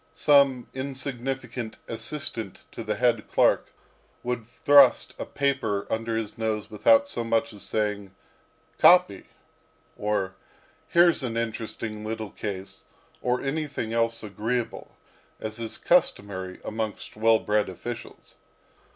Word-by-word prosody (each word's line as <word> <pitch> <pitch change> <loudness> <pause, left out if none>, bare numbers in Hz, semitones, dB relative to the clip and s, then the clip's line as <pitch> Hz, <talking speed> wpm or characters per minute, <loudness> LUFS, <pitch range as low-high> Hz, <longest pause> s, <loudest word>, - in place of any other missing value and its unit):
Some 140 -4 +4
insignificant 130 -3 -4
assistant 115 -3 -5
to - - -6
the - - -1
head - - +1
clerk - - +3 0.5
would 120 -2 -3 0.2
thrust 140 -3 +6
a - - -4
paper 125 -8 0
under 115 0 -1
his 110 +1 -4
nose 110 -2 -2
without 285 0 +4
so 120 - -3
much 115 0 0
as 100 - -10
saying, 105 -3 -2 0.6
"Copy," 180 - +6 0.7
or, 105 -3 -1 0.5
"Here's 170 -2 +4
an 115 -3 -3
interesting 110 -1 -4
little 110 -1 -4
case," 100 -2 -6 0.4
or 125 0 0
anything 140 -5 -3
else 115 0 +1
agreeable, 115 +3 -3 0.4
as 110 +1 -5
is 115 -1 -4
customary 100 - +1
amongst 110 -1 -4
well 110 +1 +4
bred 105 -1 0
officials. 110 +5 -8
115 Hz, 115 wpm, -26 LUFS, 105-130 Hz, 0.7 s, thrust